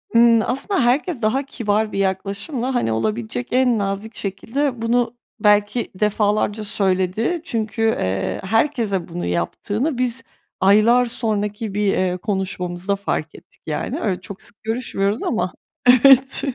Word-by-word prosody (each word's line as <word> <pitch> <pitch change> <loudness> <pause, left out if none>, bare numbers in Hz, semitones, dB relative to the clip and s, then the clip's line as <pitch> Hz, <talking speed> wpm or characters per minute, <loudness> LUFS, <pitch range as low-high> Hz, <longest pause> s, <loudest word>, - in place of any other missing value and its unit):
Imm, 230 -1 +6
aslında 280 +10 -1
herkes 270 +3 +1
daha 235 +6 +1
kibar 215 -5 -1
bir - - -3
yaklaşımla, 200 +7 -2
hani, 240 - +1
olabilecek 110 +2 -2
en 250 -2 +3
nazik 200 +2 -3
şekilde 235 +6 -2
bunu 235 +1 +1 0.2
belki 210 +3 +2
defalarca 210 +1 +1
söyledi 195 - 0
çünkü, 225 -6 -3
eee, 95 - 0
herkese 225 - 0
bunu 175 +1 -5
yaptığını 205 - -2
biz 250 0 0 0.4
aylar 215 +6 +5
sonraki 210 -2 -2
bir, 205 -1 +1
eee, 180 -1 0
konuşmamızda 190 -1 -2
fark 160 -5 -3
ettik - - -18
yani. 150 -1 -3
Öyle, 190 -4 -1
çok 195 +1 -9
sık - - -9
görüşmüyoruz 220 -2 -1
ama 200 -6 -1 0.3
evet, 265 +1 +6
210 Hz, 130 wpm, -21 LUFS, 195-240 Hz, 0.4 s, Imm